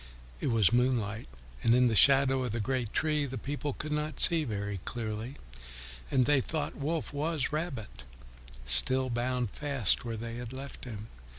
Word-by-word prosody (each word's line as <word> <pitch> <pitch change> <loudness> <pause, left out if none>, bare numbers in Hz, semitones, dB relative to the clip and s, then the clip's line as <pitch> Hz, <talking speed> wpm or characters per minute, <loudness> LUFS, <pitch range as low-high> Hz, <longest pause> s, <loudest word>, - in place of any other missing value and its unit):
It - - -2
was 115 -4 +3
moonlight, 120 -3 0 0.3
and 115 - +4
in 125 0 +4
the 115 -2 +2
shadow 135 +1 +5
of 120 -4 -3
the 115 - -2
great 120 0 -2
tree 150 -2 0
the 130 0 -5
people 145 +3 -4
could 150 +3 -5
not 150 +1 -2
see 165 -2 +5
very 100 -5 -4
clearly, 110 +5 -5 0.7
and 130 -2 +2
they 145 -1 +3
thought 150 +2 -3
Wolf 150 -2 -3
was 150 -1 -1
Rabbit, 135 - -5 0.6
still 125 - +4
bound 120 -1 -1
fast 140 -8 0
where 115 -2 -4
they 115 +1 -6
had 120 0 -7
left 135 +1 -8
him. 110 -2 -8
125 Hz, 170 wpm, -30 LUFS, 115-145 Hz, 0.7 s, shadow